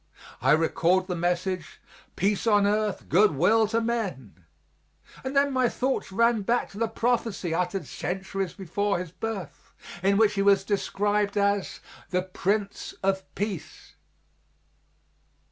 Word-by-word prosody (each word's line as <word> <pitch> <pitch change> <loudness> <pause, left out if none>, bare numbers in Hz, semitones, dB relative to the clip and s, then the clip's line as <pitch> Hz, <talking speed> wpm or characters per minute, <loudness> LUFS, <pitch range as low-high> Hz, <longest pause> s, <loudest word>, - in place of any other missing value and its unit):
I - - +5
recalled 170 +3 +2
the 180 -1 -3
message, 175 0 -2 0.4
"Peace 200 +3 0
on 205 -2 +4
earth, 210 -1 0
good 195 -2 +4
will 220 +9 +4
to 225 +2 +1
men," 190 - -3 0.8
and 265 +1 -4
then 280 0 +3
my 255 -2 +3
thoughts 260 -5 -2
ran 230 +2 +3
back 235 +5 0
to 200 - -9
the 230 - +1
prophecy 225 -6 -1
uttered 180 +3 -1
centuries 190 0 -4
before 200 +2 -1
His 175 -2 -6
birth, 200 -4 -6 0.3
in 200 +2 +3
which 220 -1 +4
He 195 - 0
was 200 -1 +4
described 205 0 0
as 200 -1 0 0.3
the 180 0 0
Prince 195 +2 -2
of 190 0 +1
Peace. 200 -5 -5
200 Hz, 135 wpm, -26 LUFS, 185-220 Hz, 0.8 s, I